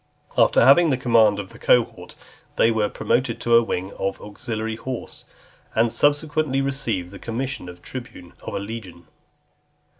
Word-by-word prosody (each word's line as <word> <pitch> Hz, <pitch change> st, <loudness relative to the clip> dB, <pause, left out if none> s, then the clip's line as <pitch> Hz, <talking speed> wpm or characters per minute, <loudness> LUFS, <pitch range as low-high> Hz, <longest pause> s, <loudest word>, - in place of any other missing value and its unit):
After -, -, +5 dB
having 165 Hz, +5 st, +6 dB
the 135 Hz, -, +1 dB
command 115 Hz, -5 st, +4 dB
of 100 Hz, +1 st, -7 dB
a 115 Hz, -, -14 dB
cohort, 120 Hz, -2 st, +1 dB, 0.4 s
they 115 Hz, -, +4 dB
were 110 Hz, -2 st, +1 dB
promoted 125 Hz, -2 st, -1 dB
to 120 Hz, -, +1 dB
a 115 Hz, -, +7 dB
wing 95 Hz, -4 st, -3 dB
of 95 Hz, 0 st, -2 dB
auxiliary 110 Hz, +1 st, -5 dB
horse, 130 Hz, 0 st, -7 dB, 0.5 s
and 115 Hz, +1 st, +3 dB
subsequently 145 Hz, -1 st, +1 dB
received 120 Hz, -10 st, -2 dB
the 100 Hz, -, -10 dB
commission 125 Hz, -3 st, -4 dB
of 90 Hz, 0 st, -13 dB
tribune 120 Hz, -9 st, -9 dB
of -, -, -6 dB
a -, -, -1 dB
legion. 100 Hz, -5 st, -8 dB
115 Hz, 155 wpm, -23 LUFS, 100-130 Hz, 0.5 s, a